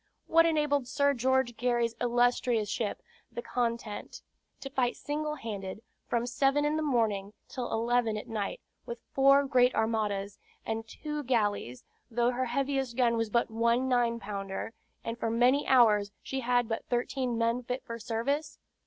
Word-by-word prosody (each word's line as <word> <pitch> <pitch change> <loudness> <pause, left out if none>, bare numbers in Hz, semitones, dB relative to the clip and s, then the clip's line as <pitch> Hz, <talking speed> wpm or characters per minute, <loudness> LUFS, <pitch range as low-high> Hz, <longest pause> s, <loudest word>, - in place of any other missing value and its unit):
What 330 0 +5
enabled 295 -5 +1
Sir 280 +1 +2
George 260 -1 +1
Gary's 240 -1 +1
illustrious 240 -2 +2
ship, 210 0 -3 0.3
the 240 - -5
Content, 235 -3 -3 0.4
to 275 - -7
fight 250 -2 +1
single 300 +1 -3
handed, 205 -4 -6 0.2
from 235 0 0
seven 275 +4 +2
in 300 +1 +1
the 315 - 0
morning 220 -8 0
till 250 -2 -5
eleven 230 -1 +1
at 210 - -7
night, 210 -3 -3 0.3
with 235 - -5
four 275 +1 +5
great 255 -2 +3
armadas 210 -3 -1 0.3
and 225 0 -3
two 300 +5 -5
galleys, 205 - -1 0.3
though 240 +1 +2
her 255 +1 -1
heaviest 270 -1 -1
gun 240 -2 +3
was 225 -1 -1
but 235 +1 +1
one 235 +3 +2
nine 240 -2 +2
pounder, 195 +1 -5 0.3
and 230 +1 -5
for 225 - -1
many 245 +5 +3
hours 215 -6 +5
she 265 - -3
had 245 -1 +1
but 225 0 -3
thirteen 245 0 -1
men 230 +2 +1
fit 250 +1 -4
for 230 -3 -6
service? 275 +7 -2
240 Hz, 160 wpm, -30 LUFS, 225-265 Hz, 0.4 s, What